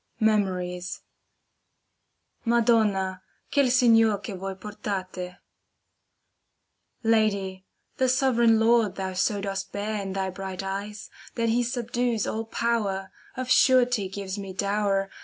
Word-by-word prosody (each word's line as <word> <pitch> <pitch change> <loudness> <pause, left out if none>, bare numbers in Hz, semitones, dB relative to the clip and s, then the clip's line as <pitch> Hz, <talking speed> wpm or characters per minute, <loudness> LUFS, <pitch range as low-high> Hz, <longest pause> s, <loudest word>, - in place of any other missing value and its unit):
tCy^^ 190 -5 +1
[T/a 180 +5 -13
Madonna, 215 -5 +2 0.3
quel 280 -2 +4
signer, 225 -4 +5
che 200 +1 -7
voi 190 +1 -5
portate 185 -2 -5 1.7
Lady, 200 -4 +1 0.3
the 260 - +2
sovran 250 -3 +3
Lord 225 -3 +3
thou 190 -1 -3
so 200 +3 0
dost 195 -1 -4
bear 210 +1 -3
In 195 -1 -5
thy 190 -1 -2
bright 190 0 -6
eyes, 200 +2 -5 0.2
that 230 -1 0
he 235 +2 +2
subdues 240 -1 -1
all 225 +1 -3
power, 210 -5 -1 0.3
Of 255 0 -3
surety 250 -7 +4
gives 195 0 -5
me 195 -2 -7
dow^er. 200 0 0
205 Hz, 120 wpm, -26 LUFS, 190-230 Hz, 1.7 s, signer